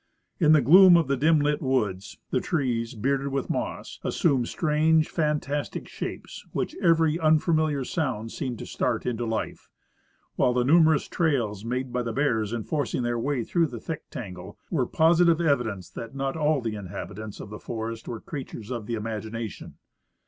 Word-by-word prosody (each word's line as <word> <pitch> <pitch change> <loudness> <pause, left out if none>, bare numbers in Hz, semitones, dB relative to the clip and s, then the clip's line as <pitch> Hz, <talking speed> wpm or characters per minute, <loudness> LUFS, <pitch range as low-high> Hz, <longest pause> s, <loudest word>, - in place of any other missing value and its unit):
* - - -48
In 155 -3 +5
the 155 - +6
gloom 180 +6 +8
of 165 -4 +1
the 140 - +1
dim 155 +4 +3
lit 145 0 +1
woods, 105 -8 -1
the 130 - +2
trees, 125 -6 -1
bearded 135 +5 0
with 135 -1 -2
moss, - - -4
as - - -2
sumed 135 -8 +2
strange, 155 0 +2
fantastic 150 -2 -2
shapes, - - -7
which - - -2
every 165 -1 +3
unfamiliar 155 -2 +2
sound 125 -10 -2
seemed 125 -4 -4
to - - -7
start - - -1
into 120 -1 -2
life; 110 0 -4 0.7
while 125 - +3
the 125 0 +2
numerous 160 +1 +4
trails 120 - 0
made 125 +2 -3
by 125 - 0
the 115 -2 -3
bears 115 -7 0
in 115 -2 -3
forcing 140 -3 -1
their 120 0 -1
way 135 0 -1
through 170 +6 +1
the" 120 -5 -7
thick 160 +6 -6
tangle 95 -3 -8
were 140 -8 +1
posi 165 +2 +4
tive 165 -1 +4
evidence 125 - 0
that 115 +3 -8
not 135 0 -2
all 150 -2 +1
the 115 -2 -3
inhabitants 105 +1 -7
of 105 - -9
the 105 - -7
forest 115 0 -5
were 115 - -5
crea 140 +3 -6
tures 110 +1 -9
of 115 -4 -4
the 115 - -1
imagination. 110 0 -5
130 Hz, 185 wpm, -26 LUFS, 115-155 Hz, 0.7 s, gloom